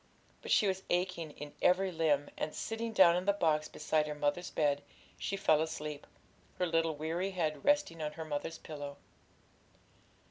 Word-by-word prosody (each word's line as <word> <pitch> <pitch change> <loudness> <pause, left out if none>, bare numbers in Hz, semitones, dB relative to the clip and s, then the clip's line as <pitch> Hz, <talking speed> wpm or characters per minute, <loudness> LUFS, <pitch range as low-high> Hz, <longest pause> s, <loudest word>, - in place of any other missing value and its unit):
But - - -8
she - - +5
was 190 -1 0
aching 175 -2 0
in 145 0 -9
every 185 +1 +3
limb, 155 -4 +1
and, 155 - -3
sitting 225 +1 -3
down 185 -5 +7
on 180 +1 -1
the 200 - +4
box 155 -5 +1
beside 155 0 0
her 150 - -4
mother's 150 +4 -1
bed, 145 -2 +1 0.4
she 195 - -2
fell 155 -5 +4
asleep, 150 -2 -4 0.5
her 180 - +1
little 165 -2 +1
weary 165 +5 -2
head 155 -6 -2
resting 290 - +2
on 150 0 -3
her 160 - -6
mother's 155 +2 -3
pillow. 145 -2 -7
160 Hz, 170 wpm, -33 LUFS, 150-180 Hz, 0.5 s, down